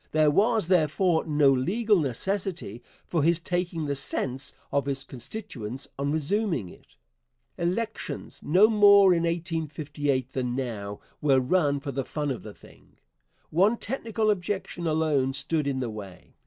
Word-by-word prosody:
There 155 -1 +4
was, 215 +3 +2
therefore, 170 0 +2
no 145 -3 +4
legal 200 - +2
necessity 165 - -2 0.2
for 165 - 0
his 165 +3 +3
taking 175 -2 -2
the 145 - -1
sense 135 -1 -1 0.2
of 140 -1 0
his 140 -1 0
constituents 130 - -6
on 140 +1 0
resuming 160 - 0
it. - - -18 0.6
Elections 215 +6 -3
no 185 +8 +5
more 200 -3 +7
in 170 -1 +1
1858 150 -5 -2
than 125 -2 -2
now 105 -6 -4 0.2
were 135 -3 +4
run 145 +1 +1
for 140 0 -5
the 135 0 -2
fun 150 +1 -3
of 125 - -4
the 105 -2 -10
thing. - - -19 0.5
One 195 +8 +3
technical 225 -2 -1
objection 185 -3 -3
alone 155 -4 +1
stood 145 +2 -1
in 135 -2 -1
the 120 - -2
way. 100 -4 -10
155 Hz, 145 wpm, -27 LUFS, 135-185 Hz, 0.6 s, more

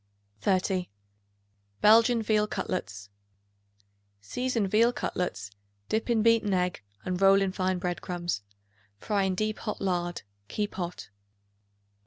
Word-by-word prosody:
30. 185 - 0 0.9
Belgian 230 +2 +5
Veal 210 -1 +2
Cutlets. 100 - -4 1.1
Season 240 - -1
veal 225 +5 +4
cutlets; 100 - -3 0.4
dip 220 +2 -1
in 225 -2 +3
beaten 225 -4 +3
egg 180 0 -1 0.2
and 180 0 -2
roll 195 0 +7
in 195 -1 0
fine 185 -1 0
bread 180 -1 -3
crumbs. 175 - -3 0.6
Fry 200 - -1
in 190 -1 0
deep 215 +2 -1
hot 210 - -4
lard; 175 -2 -2 0.2
keep 210 - -3
hot. 175 - -5
190 Hz, 120 wpm, -28 LUFS, 180-215 Hz, 1.1 s, roll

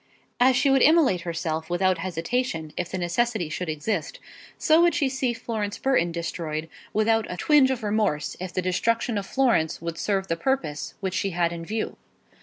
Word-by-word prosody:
As 255 +1 +5
she 275 +2 +3
would 270 -1 +4
immolate 295 - +5
herself 165 -1 -3
without 185 0 +1
hesitation, 165 -1 -2
if 180 -1 -3
the 190 - -3
necessity 185 +1 0
should 165 +2 -4
exist, 155 +3 -3 0.4
so 315 +1 +4
would 345 0 +4
she 295 -5 +2
see 265 -1 -1
Florence 225 -3 -4
Burton 255 -11 +1
destroyed 165 -2 -4 0.2
without 225 +1 +1
a 180 - -5
twinge 295 - +4
of 255 -3 -2
remorse, 205 -8 0
if 185 0 -5
the 185 - -2
destruction 230 +6 0
of 195 - -7
Florence 235 -12 +1
would 170 0 -5
serve 195 -2 0
the 165 - 0
purpose 165 - -2
which 190 -2 -2
she 195 - 0
had 170 -1 +2
in 165 -1 -6
view. 215 +5 -3
190 Hz, 185 wpm, -25 LUFS, 170-245 Hz, 0.4 s, As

